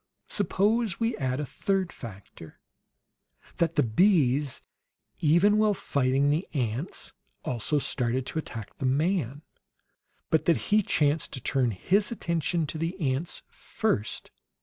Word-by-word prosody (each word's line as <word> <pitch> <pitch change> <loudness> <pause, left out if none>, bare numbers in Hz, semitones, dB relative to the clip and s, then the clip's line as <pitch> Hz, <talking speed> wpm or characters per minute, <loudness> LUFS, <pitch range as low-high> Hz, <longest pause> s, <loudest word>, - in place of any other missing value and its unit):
Suppose 220 - +1
we 230 0 +1
add 130 -1 -1
a 150 - -2
third 190 +5 -1
factor: 95 -7 -11 1.0
that 170 0 +1
the - - +4
bees, 140 - +3 0.6
even 175 +7 +4
while 215 -1 +3
fighting 140 -2 +1
the 160 +5 0
ants, 125 - -3 0.3
also 125 +5 0
started 130 -2 -1
to 160 - -3
attack 115 -8 -7
the 130 - 0
man; 145 - 0 0.9
but 155 -1 +3
that 170 - +4
he 215 +1 +2
chanced 150 -5 +1
to 130 - -3
turn 130 0 +1
his 195 - +1
attention 170 -5 0
to 155 +2 -5
the 170 +4 -3
ants 145 +1 -2
FIRST. 105 +1 -2
150 Hz, 130 wpm, -27 LUFS, 130-185 Hz, 1.0 s, the